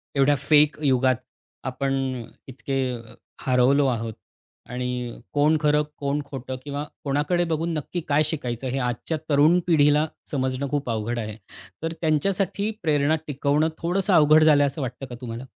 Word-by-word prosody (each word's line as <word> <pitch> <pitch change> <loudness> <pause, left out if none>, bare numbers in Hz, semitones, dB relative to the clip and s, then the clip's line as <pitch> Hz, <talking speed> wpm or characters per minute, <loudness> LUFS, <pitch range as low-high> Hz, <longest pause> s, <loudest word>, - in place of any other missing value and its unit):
एवढ्या 140 +1 +4
फेक 150 +2 +3
युगात 130 -1 +3 0.5
आपण 135 +1 -1 0.5
इतके 135 +1 -4 0.7
हरवलो 130 +3 +4
आहोत 115 -2 -2 0.6
आणि 125 -1 -3 0.2
कोण 150 +2 +3
खरं 150 0 +3
कोण 145 +1 -1
खोटं 130 -2 -6
किंवा 145 0 -4 0.2
कोणाकडे 150 +5 +1
बघून 165 +1 -1
नक्की 160 +3 -3
काय 145 +2 +4
शिकायचं 130 -5 -3
हे 130 +2 -1
आजच्या 125 +6 -2
तरुण 150 +5 +5
पिढीला 150 -2 +4 0.3
समजणं 130 0 -1
खूप 145 -3 -1
अवघड 115 +1 -2
आहे. 110 -1 -5 0.5
तर 165 - -2
त्यांच्यासाठी 195 +6 0
प्रेरणा 150 -1 +2
टिकवणं 145 +2 +1
थोडंसं 185 +4 0
अवघड 155 -1 +6
झालंय 145 -2 +5
असं 140 +2 -5
वाटतं 130 +1 -5
का 125 - -8
तुम्हाला? 120 +1 -6
145 Hz, 140 wpm, -24 LUFS, 130-155 Hz, 0.7 s, अवघड